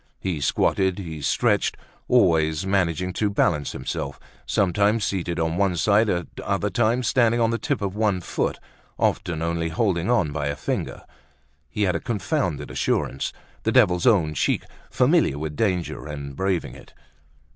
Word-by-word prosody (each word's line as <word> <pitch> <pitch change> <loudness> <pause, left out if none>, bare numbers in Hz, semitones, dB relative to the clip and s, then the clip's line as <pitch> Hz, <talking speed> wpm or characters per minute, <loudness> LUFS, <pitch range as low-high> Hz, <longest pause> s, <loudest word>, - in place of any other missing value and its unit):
He 90 -6 -3
squatted, 95 +6 +1
he 80 -6 -6
stretched, - - +1 0.3
always 80 -9 +3
managing 90 -2 0
to 105 +2 0
balance 85 -7 +1
himself, - - -4 0.3
sometimes 100 +3 +2
seated 90 -3 -2
on 80 +1 0
one 95 -2 +2
side, 105 +6 +3
at 85 -2 0 0.2
other 100 +1 -1
times 120 +3 +1
standing 120 -3 +3
on 115 -1 +2
the 115 - -1
tip 140 -8 -2
of 100 0 -2
one 105 -3 +1
foot, 90 - -2 0.4
often 80 -2 0
only 85 0 -1
holding 85 +1 0
on 90 -12 +2
by 75 -1 -2
a 70 - -2
finger. - - -4 0.7
He 105 - -1
had 95 -2 +1
a - - 0
confounded 95 - -2
assurance, 65 - -1 0.3
the - - 0
devil's 90 +5 +4
own 85 -10 +4
cheek, - - 0 0.3
familiar 70 - +3
with 75 0 -4
danger, 90 -6 -1
and 70 -2 -6
braving 95 0 -1
it. - - -15
90 Hz, 155 wpm, -24 LUFS, 80-105 Hz, 0.7 s, devil's